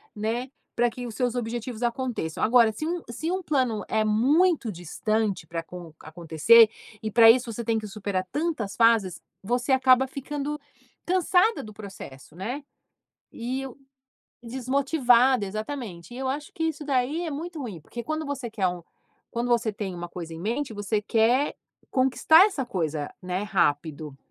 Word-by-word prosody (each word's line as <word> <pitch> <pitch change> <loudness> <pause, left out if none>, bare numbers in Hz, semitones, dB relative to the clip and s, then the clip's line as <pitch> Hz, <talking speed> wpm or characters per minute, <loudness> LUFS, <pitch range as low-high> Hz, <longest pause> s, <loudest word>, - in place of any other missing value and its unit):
né, 230 +5 -2 0.3
pra 240 0 +3
que 245 0 -6
os 220 - -8
seus 245 -1 0
objetivos 240 0 -4
aconteçam. 240 - -2
Agora, 230 -1 +5
se 305 +9 -5
um 345 +1 -2
se 315 +9 -3
um 375 0 -1
plano 255 -8 0
é 220 0 +1
muito 270 - +3
distante 205 +4 -2
para 165 0 -3
acon 170 -1 -10
acontecer, 170 +8 +5 0.3
e 220 - -3
para 225 0 +9
isso 245 -1 0
você 235 +2 -5
tem 225 -1 +1
que 215 - -7
superar 195 -2 -3
tantas 295 - -2
fases, 225 -6 +3 0.2
você 245 +5 -1
acaba 260 0 +5
ficando 290 +2 -4 0.5
cansada 370 +4 +2
do 215 -1 -10
processo, 175 -8 -11
né? 245 +10 -4 0.7
E 255 +3 -4
o 260 - -11 0.7
desmotivada, 255 -1 +2
exatamente 215 -2 -6
e - - -7
eu 265 0 -3
acho 285 +3 -3
que 325 - -3
isso 315 -2 -2
daí 285 +5 0
é - - -3
muito 325 +2 -5
ruim, 215 - -6
porque 235 +9 -7
quando 310 +4 -3
você 270 -4 -4
quer 205 -4 0
um 180 -1 -4 0.5
quando 235 +1 -2
você 230 -2 +2
tem 195 -3 -4
uma 175 0 -6
coisa 170 -2 -7
em 160 - -8
mente, 230 +6 -2
você 205 +1 -1
quer 235 +6 +2 0.4
conquistar 275 +7 +5
essa 300 - -2
coisa, 160 -9 -3
né, 185 +2 -2
rápido. 150 -6 -1
235 Hz, 165 wpm, -26 LUFS, 200-270 Hz, 0.7 s, para